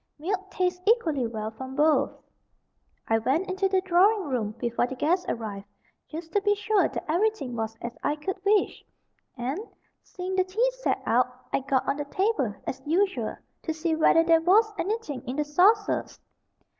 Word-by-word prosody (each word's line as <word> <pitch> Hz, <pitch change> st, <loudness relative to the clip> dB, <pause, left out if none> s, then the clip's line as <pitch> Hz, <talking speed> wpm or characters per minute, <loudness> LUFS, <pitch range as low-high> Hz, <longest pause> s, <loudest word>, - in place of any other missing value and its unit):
Milk 390 Hz, +5 st, -3 dB
tastes 360 Hz, -1 st, -1 dB
equally 320 Hz, -, +2 dB
well 220 Hz, -1 st, -4 dB
from 260 Hz, +4 st, -8 dB
both. 300 Hz, +1 st, +3 dB, 1.0 s
I 225 Hz, 0 st, +3 dB
went 290 Hz, -, 0 dB
into 380 Hz, +1 st, 0 dB
the 380 Hz, -1 st, +2 dB
drawing 380 Hz, 0 st, +3 dB
room 220 Hz, -5 st, -2 dB
before 240 Hz, 0 st, 0 dB
the 265 Hz, -, -6 dB
guests 345 Hz, +8 st, +1 dB
arrived 205 Hz, -3 st, -4 dB, 0.4 s
just 325 Hz, +1 st, -8 dB
to 410 Hz, -, +2 dB
be 410 Hz, +1 st, +2 dB
sure 415 Hz, 0 st, +2 dB
that -, -, -6 dB
everything 330 Hz, -, 0 dB
was 225 Hz, 0 st, -3 dB
as 235 Hz, 0 st, -5 dB
I 295 Hz, -, 0 dB
could 375 Hz, +5 st, -5 dB
wish 410 Hz, +1 st, +2 dB, 0.5 s
and, 260 Hz, +8 st, -2 dB, 0.4 s
seeing 370 Hz, 0 st, -5 dB
the 370 Hz, -, +3 dB
tea 445 Hz, +7 st, +1 dB
set -, -, -1 dB
out, 250 Hz, +2 st, +1 dB
I -, -, +3 dB
got 265 Hz, -1 st, 0 dB
on 275 Hz, -, 0 dB
the 290 Hz, -, -3 dB
table, 290 Hz, -, 0 dB
as 265 Hz, -, -4 dB
usual, 380 Hz, +6 st, 0 dB, 0.2 s
to 320 Hz, -, -3 dB
see 320 Hz, 0 st, 0 dB
whether 330 Hz, +1 st, +5 dB
there 330 Hz, -1 st, +4 dB
was 425 Hz, +6 st, +4 dB
anything 395 Hz, -, -2 dB
in 250 Hz, -, -3 dB
the 300 Hz, +1 st, 0 dB
saucers. 400 Hz, +8 st, +2 dB
325 Hz, 175 wpm, -26 LUFS, 260-385 Hz, 1.0 s, whether